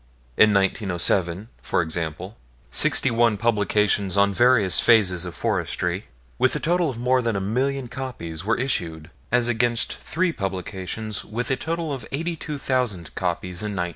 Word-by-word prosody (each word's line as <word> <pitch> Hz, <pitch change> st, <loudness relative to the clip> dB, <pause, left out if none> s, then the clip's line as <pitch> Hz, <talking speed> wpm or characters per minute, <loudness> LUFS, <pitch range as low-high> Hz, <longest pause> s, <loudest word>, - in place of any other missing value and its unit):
In 110 Hz, -, +6 dB
1907, 95 Hz, -1 st, +1 dB
for -, -, 0 dB
example, 85 Hz, +4 st, -4 dB, 0.4 s
sixty 130 Hz, -, +2 dB
one 115 Hz, -2 st, +3 dB
publications 105 Hz, -3 st, +1 dB
on 100 Hz, 0 st, +4 dB
various 115 Hz, -4 st, +4 dB
phases 95 Hz, -7 st, +4 dB
of 85 Hz, -, -7 dB
forestry, 90 Hz, -2 st, -1 dB, 0.3 s
with -, -, +3 dB
a -, -, -1 dB
total 175 Hz, 0 st, +1 dB
of 125 Hz, -, -5 dB
more 125 Hz, +2 st, +2 dB
than 115 Hz, -3 st, -1 dB
a -, -, 0 dB
million 130 Hz, +6 st, -1 dB
copies, 115 Hz, -, -6 dB
were 110 Hz, +4 st, +1 dB
issued, 85 Hz, -, -2 dB, 0.2 s
as 120 Hz, 0 st, +3 dB
against 120 Hz, 0 st, +1 dB
three 175 Hz, +1 st, -1 dB
publications, 95 Hz, -, -4 dB
with 120 Hz, +4 st, -4 dB
a -, -, +3 dB
total 165 Hz, +1 st, -3 dB
of 135 Hz, -, -5 dB
eighty 165 Hz, +5 st, -2 dB
two 150 Hz, -2 st, -6 dB
thousand 120 Hz, -, -2 dB
copies, 90 Hz, 0 st, -3 dB
in 105 Hz, -1 st, -3 dB
1901. 90 Hz, -1 st, -1 dB
105 Hz, 160 wpm, -23 LUFS, 90-125 Hz, 0.4 s, In